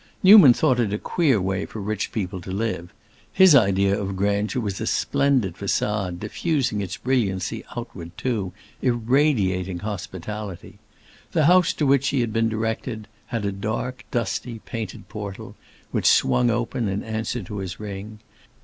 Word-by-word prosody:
Newman 190 - +10
thought 125 +1 +2
it 110 -4 +1
a 105 - 0
queer 140 - +1
way 95 +1 -1
for 110 - -7
rich 105 0 -3
people 95 -4 -3
to 90 - -10
live; 95 -3 -3 0.4
his 190 -3 +7
ideal 100 -4 +4
of 95 -1 -3
grandeur 100 +5 0
was 100 -5 -3
a - - -2
splendid 130 -10 +1
façade 100 -1 -1
diffusing 130 - -1
its 95 - -4
brilliancy 105 -8 -1
outward 105 -8 -7
too, 110 -8 -2 0.3
irradiating 115 - +1
hospitality. 100 0 -6 0.5
The 155 - +3
house 180 +1 +5
to 150 - -1
which 135 0 +3
he 135 -2 +1
had 115 -2 -2
been 115 0 +2
directed 110 0 -3 0.2
had 115 -4 -3
a 100 - 0
dark, 110 +6 -4
dusty, 115 +1 -2
painted 110 -5 -6
portal, 105 -3 -7 0.4
which - - +1
swung 120 - +4
open 120 0 -1
in 95 +1 -2
answer 110 +1 -3
to 105 +3 -7
his 95 -2 -6
ring. 105 +1 -7
110 Hz, 155 wpm, -23 LUFS, 95-125 Hz, 0.5 s, Newman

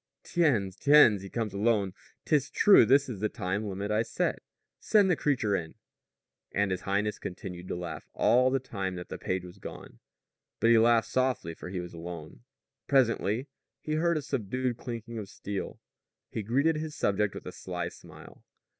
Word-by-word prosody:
"Tiens! 120 - +1
Tiens! 130 -5 +6
He 95 - -8
comes 110 -2 -3
alone! 100 -2 +1 0.3
'Tis 145 -3 +2
true, 200 - +6
this 140 +2 +5
is 115 -7 -6
the 105 +1 0
time 100 -1 -2
limit 100 +2 -3
I 105 +1 +2
set. 115 - -1 0.4
Send 205 -3 +4
the - - +4
creature 125 -10 +1
in." 80 -4 -4 0.8
And 100 -1 +1
his 90 -1 -2
highness 105 +2 -1
continued 90 -1 -7
to - - -3
laugh 90 -1 -6
all 125 +2 +4
the 135 - +2
time 100 -8 -4
that 90 0 -7
the - - -6
page 95 -1 -2
was 90 +2 -12
gone. - - -10 0.6
But 115 - +4
he 115 - +7
laughed 115 0 +4
softly, 130 -10 0
for 90 - -9
he 90 0 -4
was 90 0 -7
alone. 85 -2 -8 0.5
Presently 120 -3 +2 0.3
he 155 - -4
heard 170 +1 +2
a 150 - -3
subdued 130 -2 -2
clinking 115 -1 -6
of 100 -3 -7
steel. 100 -1 -5 0.5
He 110 - -3
greeted 140 +9 +1
his 155 0 -5
subject 100 -4 0
with - - -8
a - - -5
sly 90 -2 -4
smile. - - -14
110 Hz, 180 wpm, -29 LUFS, 95-130 Hz, 0.8 s, he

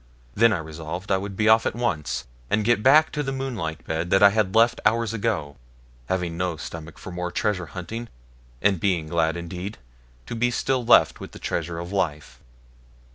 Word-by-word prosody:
Then 115 +6 +5
I 100 - +1
resolved 80 +4 -6
I 95 - +4
would 100 0 -6
be 110 - +2
off 110 +1 +5
at - - -2
once, 110 -12 -2 0.2
and 105 +1 +1
get 120 -1 +3
back 150 +6 +6
to 150 - -2
the 135 -2 -2
moonlight 120 - -4
bed 80 +2 -2
that 95 +2 +4
I 100 - +9
had 105 -2 0
left 115 +1 +4
hours 115 0 +2
ago, 100 -11 -2 0.5
having 90 -1 -1
no 90 -2 -1
stomach 80 +2 -8
for 95 - -9
more 90 0 -3
treasure 90 -2 -1
hunting, 95 +9 -6 0.6
and 100 -3 +3
being 90 -5 +1
glad 80 0 +1
indeed 90 +4 -6 0.5
to - - -6
be 120 +1 +1
still 130 +1 0
left 120 - +5
with - - -9
the - - -9
treasure 85 0 -3
of 85 +2 -6
life. 80 -7 -2
95 Hz, 190 wpm, -24 LUFS, 85-115 Hz, 0.6 s, I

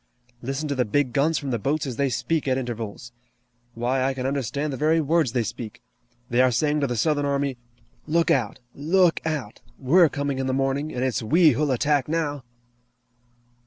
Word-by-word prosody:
Listen 135 +5 -3
to 145 - -1
the 130 -2 +1
big 125 +3 0
guns 155 +4 +2
from 140 -3 -4
the 120 - -1
boats 145 +8 -1
as 130 -3 -4
they 140 -1 +1
speak 155 +5 -1
at 130 -1 +2
intervals! 120 -2 -5 0.6
Why, 125 +3 0
I 135 0 0
can 130 -1 -4
understand 140 +2 -2
the - - -4
very 155 +3 +2
words 155 -3 +1
they 120 -2 +1
speak! 110 0 -7 0.5
They 120 +1 +2
are 130 - +5
saying 150 +5 +1
to 140 - 0
the 120 - -2
Southern 150 +2 +1
army: 140 -2 -1 0.5
'Look 170 +2 +2
out! 125 -8 0 0.2
Look 170 +4 +2
out! 145 -10 -4 0.2
We're 160 +5 +4
coming 140 -1 -3
in 130 - -1
the 130 - 0
morning, 135 +3 -1
and 125 - -3
it's 130 -2 0
we 155 +8 +5
who'll 145 +3 0
attack 140 +1 +1
now!'" 150 -4 -2
140 Hz, 195 wpm, -24 LUFS, 125-150 Hz, 0.6 s, are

